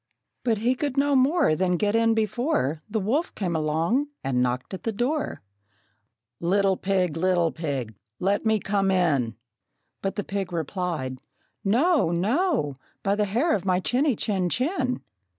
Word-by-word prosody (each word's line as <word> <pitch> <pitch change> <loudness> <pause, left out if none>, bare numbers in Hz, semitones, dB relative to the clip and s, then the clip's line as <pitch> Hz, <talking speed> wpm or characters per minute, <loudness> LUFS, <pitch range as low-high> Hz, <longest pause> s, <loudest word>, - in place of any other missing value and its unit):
But 230 -3 +2
he 235 +5 +2
could 275 +1 -3
no 285 0 +3
more 270 - +4
than 180 +1 +1
get 205 +3 +1
in 230 0 +3
before 220 - +1 0.2
The 220 +1 0
wolf 250 - -1
came 180 -5 -2
along 160 - +1 0.2
and 130 -2 +1
knocked 125 +6 -1
at 190 - -5
the 225 - -1
door: 250 - -2 1.0
"Little 195 +2 +2
pig, 185 -4 0
little 175 -1 +2
pig, 140 -9 -3 0.3
let 200 +2 +1
me 220 -1 +2
come 195 -1 0
in!" 145 - +2 0.7
But 195 - -2
the 205 - -2
pig 195 -2 -3
replied, 165 -6 -3 0.4
"No, 255 - +3
no, 220 - +1 0.3
by 195 - +2
the 210 0 +1
hair 240 - +1
of 195 - 0
my 185 -1 +2
chinny, 255 +7 +1
chin, 190 -4 0
chin!" 255 - -1
195 Hz, 155 wpm, -25 LUFS, 170-245 Hz, 1.0 s, more